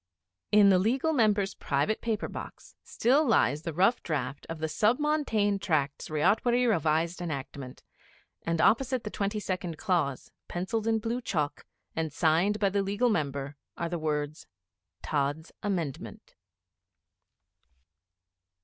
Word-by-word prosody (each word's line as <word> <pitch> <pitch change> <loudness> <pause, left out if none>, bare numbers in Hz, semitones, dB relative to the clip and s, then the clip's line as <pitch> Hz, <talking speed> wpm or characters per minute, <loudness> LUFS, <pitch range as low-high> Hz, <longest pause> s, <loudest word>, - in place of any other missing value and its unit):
In 205 -1 +7
the 185 - +5
Legal 260 - +1
Member's 210 -6 +2
private 145 +10 -1
paper 225 -2 -1
box - - -9
still 270 +6 +2
lies 155 - +2
the 165 - -4
rough 195 +9 +2
draft 140 -3 -3
of 165 - -4
the 160 0 -2
Sub 215 +9 +2
Montane 250 -10 +1
Tracts 155 -6 -1
Ryotwary 235 +11 +2
Revised 165 -3 +1
Enactment; 140 -5 -6 0.6
and 165 -1 -1
opposite 255 +5 +3
the 210 - -5
twenty 205 +1 -2
second 185 -4 -3
clause, 170 -9 -1 0.2
pencilled 210 +5 -2
in 225 0 +3
blue 230 +3 -2
chalk, 150 -10 -2 0.3
and 160 -1 -2
signed 175 +8 +2
by 200 -2 +3
the 200 +1 0
Legal 205 +5 +1
Member 140 -6 -2 0.2
are 170 - -2
the 175 -1 -3
words 150 -1 -3 0.6
'Tods' 145 +2 -1
Amendment.' 175 -9 -4
185 Hz, 130 wpm, -29 LUFS, 155-220 Hz, 0.6 s, In